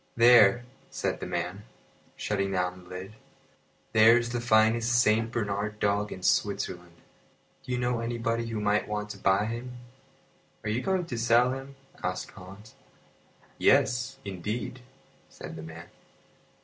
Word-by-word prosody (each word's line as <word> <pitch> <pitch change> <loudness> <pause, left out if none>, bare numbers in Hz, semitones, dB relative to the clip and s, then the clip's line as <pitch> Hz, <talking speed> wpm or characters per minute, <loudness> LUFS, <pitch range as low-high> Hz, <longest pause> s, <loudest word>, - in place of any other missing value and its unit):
"There," 120 -1 +6 0.2
said - - -2
the - - -5
man, - - -3 0.5
shutting 100 -2 -2
down 90 0 -2
the - - -17
lid, 95 +3 -8 0.8
"there 110 +2 +7
is 120 -1 -2
the 120 0 -2
finest 115 +1 +3
Saint 115 0 +2
Bernard 105 -2 -2
dog 100 0 0
in 95 - -8
Switzerland. 90 -4 -1 0.7
Do - - -7
you 125 - 0
know 120 -1 0
anybody 115 0 -2
who 115 -2 -3
might 105 0 +1
want 105 0 -3
to - - -9
buy 95 +2 +2
him?" 120 +2 -6 0.9
"Are 105 - -2
you 115 +4 -1
going 190 +1 0
to 125 -7 -5
sell 120 +2 +4
him?" 135 +1 -7 0.3
asked - - -3
Hans. 100 +4 -13 0.9
"Yes, 125 +2 +2
indeed," 105 +6 -4 0.5
said - - -9
the 80 - -7
man. 80 +1 -9
110 Hz, 145 wpm, -28 LUFS, 100-120 Hz, 0.9 s, there